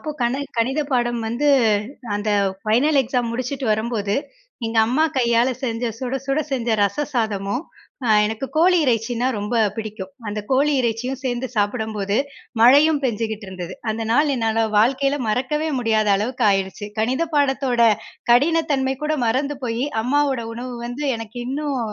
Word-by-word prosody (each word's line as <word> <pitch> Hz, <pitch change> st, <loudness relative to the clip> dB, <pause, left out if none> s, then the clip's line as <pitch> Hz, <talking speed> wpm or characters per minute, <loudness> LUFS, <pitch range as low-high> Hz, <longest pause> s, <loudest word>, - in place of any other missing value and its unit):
அப்போ 310 Hz, -, -5 dB
கண 240 Hz, +2 st, +1 dB, 0.2 s
கணிதப் 275 Hz, +5 st, 0 dB
பாடம் 240 Hz, -1 st, +1 dB
வந்து 275 Hz, +6 st, 0 dB, 0.7 s
அந்த 205 Hz, +1 st, -1 dB, 0.3 s
ஃபைனல் 270 Hz, +7 st, +3 dB
எக்ஸாம் 240 Hz, -1 st, -1 dB
முடிச்சுட்டு 255 Hz, +2 st, -3 dB
வரும்போது, 215 Hz, -2 st, -1 dB, 0.5 s
எங்க 225 Hz, 0 st, -1 dB
அம்மா 285 Hz, +6 st, +2 dB
கையால 235 Hz, 0 st, +3 dB
செஞ்ச 235 Hz, -1 st, -1 dB
சுட 255 Hz, +1 st, -4 dB
சுட 275 Hz, +2 st, +1 dB
செஞ்ச 245 Hz, -3 st, -1 dB
ரச 200 Hz, +7 st, +1 dB
சாதமும், 220 Hz, -, -1 dB, 0.4 s
அ -, -, -1 dB, 0.2 s
எனக்கு 220 Hz, +5 st, -3 dB
கோழி 360 Hz, +3 st, +5 dB
இறைச்சினா 235 Hz, 0 st, 0 dB
ரொம்ப 205 Hz, +3 st, -4 dB, 0.2 s
பிடிக்கும். 215 Hz, -1 st, -6 dB, 0.2 s
அந்த 210 Hz, +1 st, -3 dB
கோழி 280 Hz, +3 st, +3 dB
இறைச்சியும் 245 Hz, +3 st, -2 dB
சேர்ந்து 250 Hz, 0 st, -1 dB
சாப்பிடும்போது, 210 Hz, -1 st, -1 dB, 0.4 s
மழையும் 285 Hz, +5 st, +6 dB
பெஞ்சுகிட்டு 220 Hz, -3 st, -2 dB
இருந்தது. 185 Hz, -1 st, -7 dB, 0.2 s
அந்த 225 Hz, +1 st, -3 dB
நாள் 290 Hz, +2 st, +3 dB
என்னால 225 Hz, -1 st, +1 dB
வாழ்க்கைல 275 Hz, +5 st, +2 dB
மறக்கவே 265 Hz, +8 st, 0 dB
முடியாத 220 Hz, -3 st, +1 dB
அளவுக்கு 235 Hz, +3 st, -1 dB
ஆயிடுச்சு. 195 Hz, +1 st, -2 dB
கணித 255 Hz, +8 st, +1 dB
பாடத்தோட 270 Hz, -4 st, +1 dB, 0.5 s
கடினத்தன்மை 280 Hz, -1 st, +2 dB
கூட 305 Hz, +1 st, 0 dB
மறந்து 275 Hz, +5 st, 0 dB
போயி 235 Hz, +2 st, -1 dB, 0.2 s
அம்மாவோட 275 Hz, 0 st, +1 dB
உணவு 245 Hz, +2 st, -6 dB
வந்து 245 Hz, +5 st, -5 dB
எனக்கு 225 Hz, +1 st, -9 dB
இன்னும் 280 Hz, +1 st, -2 dB
245 Hz, 140 wpm, -21 LUFS, 220-270 Hz, 0.7 s, மழையும்